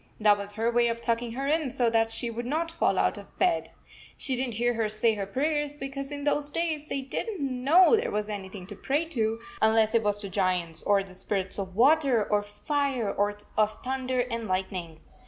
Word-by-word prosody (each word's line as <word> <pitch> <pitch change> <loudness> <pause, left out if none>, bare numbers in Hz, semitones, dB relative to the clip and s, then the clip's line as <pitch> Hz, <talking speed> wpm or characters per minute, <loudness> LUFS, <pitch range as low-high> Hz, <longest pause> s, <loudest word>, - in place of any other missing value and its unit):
That 210 -1 +5
was 200 0 -6
her 225 +3 0
way 240 0 +3
of 230 0 -1
tucking 235 0 -1
her 270 +3 -3
in 305 0 +1
so 250 -2 +1
that 225 0 +2
she 235 +1 -1
would 240 +1 -5
not 325 +4 -1
fall 330 - +1
out - - +1
of - - -15
bed. 355 -2 +1 0.5
She 265 - -1
didn 255 0 -1
t 220 - -6
hear 240 +1 +2
her 225 -2 0
say 215 +1 +3
her 200 -2 -4
prayers, 295 +5 -1
because 275 0 -5
in 285 0 -5
those 290 0 0
days 310 -1 -2
they 275 - -1
did 270 - -3
n 435 -3 -4
t 295 - -4
know 280 - +5
there 435 - 0
was 210 0 -2
anything 195 -2 -6
to 205 +2 -9
pray 285 +10 0
to, 225 -8 -1 0.2
unless 220 0 +4
it 230 - +4
was 205 -1 0
to 200 - -1
giants, 180 -4 0
or 200 -1 +2
the 190 -1 -13
spirits 190 +1 -2
of 190 -2 -5
water 265 -2 +4
or 210 - +2
of 205 - -9
fire, 265 -1 -1
or 205 0 0 0.2
of 215 0 +1
thunder 260 -1 -1
and 230 -2 -3
lightning. 185 -4 -3
235 Hz, 230 wpm, -27 LUFS, 205-275 Hz, 0.5 s, That